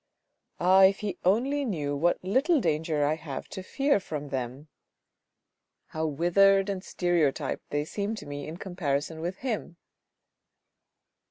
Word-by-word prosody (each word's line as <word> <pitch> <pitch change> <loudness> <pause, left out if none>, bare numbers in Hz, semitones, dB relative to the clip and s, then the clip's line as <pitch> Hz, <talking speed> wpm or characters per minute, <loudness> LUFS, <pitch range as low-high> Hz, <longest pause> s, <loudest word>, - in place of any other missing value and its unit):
Ah, 190 +2 +6
if 195 +1 +2
he 200 -4 -4
only 260 +10 +2
knew 150 - -2
what 170 +5 +2
little 270 - +2
danger 155 - 0
I 150 - +2
have 155 -3 -6
to 190 - -6
fear 275 +5 +1
from 150 -6 -6
them; 130 +2 -4 1.2
how 160 0 -2
withered 195 +6 +3
and 190 -2 -3
stereotyped 175 -6 0
they 145 0 -1
seem 205 +6 -3
to 215 - -9
me 145 0 -6
in 160 +2 -7
comparison 160 -4 -3
with 175 +3 -3
him." 215 -8 -3
175 Hz, 140 wpm, -28 LUFS, 150-195 Hz, 1.2 s, Ah